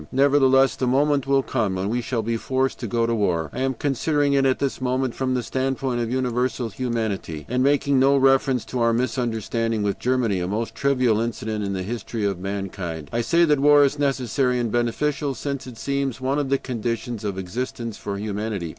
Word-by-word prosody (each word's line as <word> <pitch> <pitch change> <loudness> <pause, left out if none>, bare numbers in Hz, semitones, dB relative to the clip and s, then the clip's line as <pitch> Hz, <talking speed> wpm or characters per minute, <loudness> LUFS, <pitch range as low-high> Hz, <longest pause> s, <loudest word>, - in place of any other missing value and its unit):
Nevertheless, 135 -1 +4
the 130 - -1
moment 140 +1 +2
will 135 -1 +3
come 110 -8 -1
when 95 +1 -2
we 120 +3 0
shall 115 -1 -2
be 115 +1 -1
forced 130 +3 -1
to 120 - -4
go 115 +2 +1
to 115 - 0
war. 85 -8 0
I - - -5
am 135 0 0
considering 145 +2 +1
it 135 -1 +3
at 130 - +2
this 140 -1 -2
moment 130 -1 0
from 130 -1 -1
the 125 - -1
standpoint 130 0 -1
of 115 - -2
universal 125 -1 -1
humanity, 110 - -3
and 125 +1 0
making 140 0 +3
no 135 +1 +5
reference 135 -2 +3
to 125 - -3
our 115 0 +3
misunderstanding 115 -2 -1
with 100 -1 -1
Germany 125 -6 +1
a 90 - -2
most 110 +4 -2
trivial 130 -5 +2
incident 110 -2 -3
in 100 -1 -2
the 95 -1 -3
history 110 +1 -4
of 100 -3 -1
mankind. 95 -5 -5
I 120 - +1
say 170 +8 +3
that 150 -3 +2
war 145 +1 +6
is 140 +1 +1
necessary 130 -2 +1
and 120 -2 -1
beneficial, 135 +4 0
since 140 +1 -4
it 125 -3 -10
seems 140 0 -2
one 135 +3 0
of 140 -2 -2
the 135 - +3
conditions 120 -2 -4
of 100 -2 -3
existence 115 +4 -4
for 100 -1 -4
humanity. 105 -3 -3
125 Hz, 205 wpm, -23 LUFS, 110-135 Hz, -, war